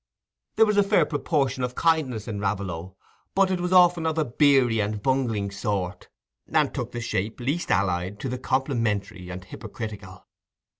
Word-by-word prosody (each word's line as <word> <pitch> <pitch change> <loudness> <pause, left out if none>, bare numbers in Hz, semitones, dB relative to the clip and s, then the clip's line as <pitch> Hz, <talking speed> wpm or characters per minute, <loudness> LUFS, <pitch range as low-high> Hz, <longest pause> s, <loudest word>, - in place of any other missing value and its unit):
There 225 - +6
was 210 -1 +1
a - - +7
fair 195 -5 +3
proportion 140 -3 -1
of 125 0 -3
kindness 140 -10 +1
in 105 -3 -4
Raveloe; 95 -3 -3 0.4
but 195 0 +3
it 185 - 0
was 180 0 -2
often 175 -2 +5
of 160 0 -1
a 155 - +2
beery 125 -3 +3
and 105 0 -1
bungling 115 -5 0
sort, 100 -2 -3 0.4
and - - +2
took - - -4
the 120 - -5
shape 110 0 -2
least 145 +8 -2
allied 90 +1 0
to - - -3
the 125 0 -3
complimentary 115 -9 -1
and 90 0 -7
hypocritical. 105 -2 -8
120 Hz, 165 wpm, -25 LUFS, 100-145 Hz, 0.4 s, a